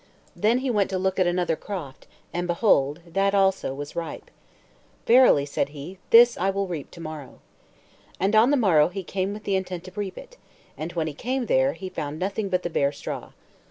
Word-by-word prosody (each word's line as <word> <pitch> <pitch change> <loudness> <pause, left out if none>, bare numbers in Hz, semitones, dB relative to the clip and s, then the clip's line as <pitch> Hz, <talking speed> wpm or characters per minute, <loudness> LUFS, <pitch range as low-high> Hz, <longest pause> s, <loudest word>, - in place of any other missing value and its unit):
Then 220 +4 +2
he 260 - +1
went 205 -4 +1
to 190 - -1
look 190 +1 -1
at 185 - +3
another 175 -2 +1
croft, 155 -8 -8 0.3
and, 175 +1 -2
behold, 170 -4 +2
that 195 +4 0
also 195 -7 +2
was 145 +2 -7
ripe. 170 -1 -6 0.7
"Verily," 240 - +6
said 140 -1 -2
he, 150 +6 -9
"this 235 +1 +7
will 195 +1 0
I - - -10
reap 160 -6 -5
to 170 - -14
morrow." 155 -5 -8 0.8
And 195 +3 +1
on 220 +4 +6
the 290 - +3
morrow 165 - +4
he 190 +2 -6
came 190 +2 -2
with 210 +1 -7
the 200 - 0
intent 180 -2 -3
to 185 - -10
reap 200 -2 -4
it; - - -12 0.4
and 160 +2 -5
when 165 -2 -1
he 155 - -4
came 250 - -2
there, 265 +3 +2
he 190 - -7
found 150 -4 -5
nothing 195 +3 -2
but 180 -1 0
the 175 - -2
bare 140 -2 +1
straw. 145 - -7
185 Hz, 205 wpm, -25 LUFS, 160-205 Hz, 0.8 s, this